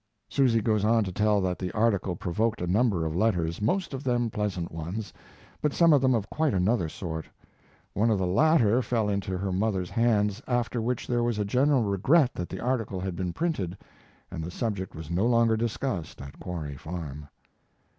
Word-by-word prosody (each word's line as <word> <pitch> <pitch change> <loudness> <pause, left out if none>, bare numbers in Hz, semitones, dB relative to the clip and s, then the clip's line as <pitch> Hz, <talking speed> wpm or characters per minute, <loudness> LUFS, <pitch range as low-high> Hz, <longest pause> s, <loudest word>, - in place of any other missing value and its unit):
Susy 125 -5 +2
goes 105 -2 +1
on 115 +1 +3
to 95 - -4
tell 105 +2 +2
that 90 -1 -1
the 90 -1 -3
article 105 -4 +1
provoked 105 +7 -1
a 90 - -2
number 95 -2 +2
of 80 0 -2
letters, 90 -4 0
most 170 - 0
of 135 +1 -5
them 120 -3 0
pleasant 100 -5 -2
ones, 85 +7 -5 0.5
but 150 - +1
some 170 -2 +5
of 140 - +5
them 130 -2 +3
of 105 -3 -1
quite 155 -6 0
another 95 -1 +1
sort. 80 -2 -5 0.7
One 110 +3 +2
of 110 - +3
the 95 - 0
latter 120 - +4
fell 115 -4 0
into 100 -2 -2
her 95 +1 -2
mother's 95 -2 -1
hands, 110 -2 +1
after 120 -1 0
which 120 +1 -2
there 120 -1 0
was 120 -2 0
general 125 +6 +2
regret 125 - +3
that 90 - -5
the - - -6
article 115 -6 -1
had 95 -1 -3
been 90 0 -2
printed, 100 - -2 0.5
and 85 -3 -5
the 85 - -5
subject 100 -1 -3
was 80 0 -8
no 95 +6 +2
longer 115 -2 +4
discussed 110 - -3
at 70 0 -10
Quarry 75 -6 -5
Farm. 75 -2 -7
105 Hz, 190 wpm, -27 LUFS, 90-120 Hz, 0.7 s, some